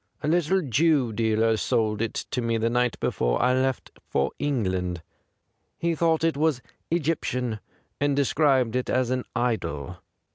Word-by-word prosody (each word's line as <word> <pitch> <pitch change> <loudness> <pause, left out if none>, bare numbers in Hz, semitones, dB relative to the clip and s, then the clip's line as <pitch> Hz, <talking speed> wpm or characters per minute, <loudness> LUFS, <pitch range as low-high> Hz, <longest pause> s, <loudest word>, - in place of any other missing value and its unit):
A - - -1
little 175 +3 +2
Jew 140 -2 +2
dealer 110 0 +2
sold 110 -1 0
it 115 - -3
me 115 -2 0
the 115 +1 0
night 125 0 +1
before - - 0
I 125 +1 +3
left 130 0 -1 0.2
for 70 0 +1
England. 95 - -1 0.7
He 170 0 0
thought 165 0 +1
it 165 -2 +2
was 150 -3 +1 0.3
Egyptian, 125 -8 -1 0.4
and 145 0 +1
described 135 -4 +2
it 125 - -1
as 130 -1 +1
an 130 -1 -1
idol. 110 - -2
125 Hz, 145 wpm, -25 LUFS, 110-145 Hz, 0.7 s, I